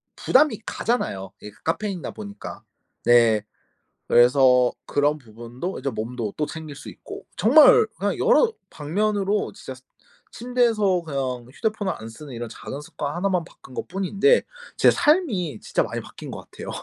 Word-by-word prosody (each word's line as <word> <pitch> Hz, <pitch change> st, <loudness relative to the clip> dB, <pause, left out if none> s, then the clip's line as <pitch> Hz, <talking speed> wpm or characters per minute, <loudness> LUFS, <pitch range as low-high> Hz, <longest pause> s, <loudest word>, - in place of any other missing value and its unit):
부담이 260 Hz, -5 st, +3 dB
가잖아요. 95 Hz, -, -2 dB
이게 105 Hz, -, -9 dB
그 -, -, -25 dB
카페인이다 185 Hz, +1 st, -2 dB
보니까. 205 Hz, -1 st, -9 dB, 0.4 s
네. 115 Hz, -3 st, +5 dB, 0.7 s
그래서 125 Hz, 0 st, +5 dB
그런 145 Hz, +1 st, +1 dB
부분도 120 Hz, -, -7 dB
이제 140 Hz, -, -2 dB
몸도 115 Hz, -2 st, -4 dB
또 150 Hz, -, -1 dB
챙길 155 Hz, -2 st, -8 dB
수 -, -, -10 dB
있고. -, -, -10 dB
정말 460 Hz, -3 st, +7 dB
그냥 -, -, -1 dB
여러 485 Hz, -1 st, +4 dB, 0.2 s
방면으로 200 Hz, +6 st, -1 dB
진짜 130 Hz, -8 st, -9 dB
스 130 Hz, -, -18 dB, 0.5 s
침대에서 230 Hz, -7 st, +1 dB
그냥 130 Hz, -6 st, -3 dB
휴대폰을 215 Hz, 0 st, -2 dB
안 110 Hz, -, -9 dB
쓰는 130 Hz, +3 st, -10 dB
이런 120 Hz, 0 st, -5 dB
작은 135 Hz, +5 st, -8 dB
습관 145 Hz, -1 st, -5 dB
1 180 Hz, +3 st, 0 dB
만 180 Hz, -3 st, 0 dB
바꾼 130 Hz, -6 st, -16 dB
것뿐인데 195 Hz, -, +2 dB, 0.3 s
제 -, -, +6 dB
삶이 225 Hz, -, +1 dB
진짜 -, -, 0 dB
많이 -, -, -4 dB
바뀐 -, -, -10 dB
거 -, -, -7 dB
같아요. -, -, -11 dB
160 Hz, 315 characters per minute, -23 LUFS, 125-210 Hz, 0.7 s, 정말